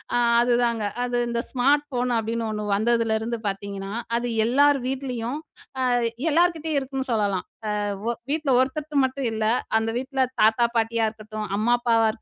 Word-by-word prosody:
அ - - +4 0.2
அதுதாங்க. 240 -2 +1 0.2
அது 245 0 -1
இந்த 235 0 -1
ஸ்மார்ட் 275 +3 +3
ஃபோன் 250 -1 -1
அப்பிடின்னு 225 +1 -2
ஒன்னு 210 0 -3
வந்ததுலேருந்து 230 +1 +1
பார்த்தீங்கன்னா, 195 0 -4 0.3
அது 245 +1 -2 0.2
எல்லார் 285 +3 +4
வீட்லயும் 255 -1 -3 0.4
அ - - 0 0.5
எல்லார்கிட்டேயும் 325 -2 +2
இருக்குன்னு 265 -1 -4
சொல்லலாம். 205 -5 0 0.4
அ - - -1 0.2
ஒ - - +1 0.2
வீட்ல 300 -3 0
ஒருத்தர்ட்ட 285 +2 0
மட்டும் 260 -1 -2
இல்ல, 220 0 -2 0.4
அந்த 225 - -2
வீட்ல 265 0 -1 0.2
தாத்தா, 225 +2 +4
பாட்டியா 225 0 +1
இருக்கட்டும். 215 -1 -7
அம்மா, 240 +3 +3
அப்பாவா 230 -2 +3
240 Hz, 145 wpm, -24 LUFS, 220-270 Hz, 0.5 s, அ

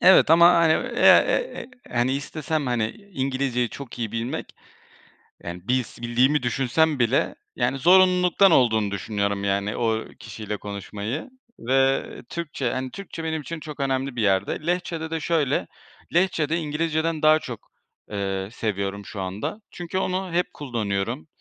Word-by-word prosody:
Evet 185 -3 +7
ama 170 +2 +8
hani, 165 -1 +5
eee, 260 - -5
eee, 485 - +5
eee, - - -8 0.2
hani 120 +2 +1
istesem 150 +1 -3
hani 115 -3 0 0.2
İngilizceyi 130 -3 -1
çok 130 0 -9
iyi 115 -2 -3
bilmek, 120 +7 -4 0.9
yani 85 +2 -7
bils 125 -2 -1
bildiğimi 125 +5 +2
düşünsem 135 +5 +1
bile 120 +3 +2 0.2
yani 125 +2 0
zorunluluktan 180 +2 +5
olduğunu 110 -7 +3
düşünüyorum, 100 +1 -2
yani 100 +1 -1
o 110 -2 0
kişiyle 105 -1 -6
konuşmayı 105 - -5 0.3
ve 135 +2 +2 0.3
Türkçe, 150 -7 -3
hani 130 0 -3
Türkçe 195 -4 -8
benim 160 -1 -2
için 165 +2 -6
çok 150 -2 -9
önemli 135 -1 -1
bir 120 - -1
yerde. 100 - 0
Lehçede 170 -2 -2
de 165 - -1
şöyle, 145 - 0 0.5
Lehçede 165 -3 +2
İngilizceden 160 0 -1
daha, 155 0 +7
eee, - - 0
çok 120 -4 -8 0.8
seviyorum 100 -3 -3
şu 100 - -6
anda. 95 - -4
Çünkü 175 +1 -5
onu 185 -1 -1
hep 180 +1 0
kullanıyorum. 100 - -3
135 Hz, 145 wpm, -24 LUFS, 110-160 Hz, 0.9 s, ama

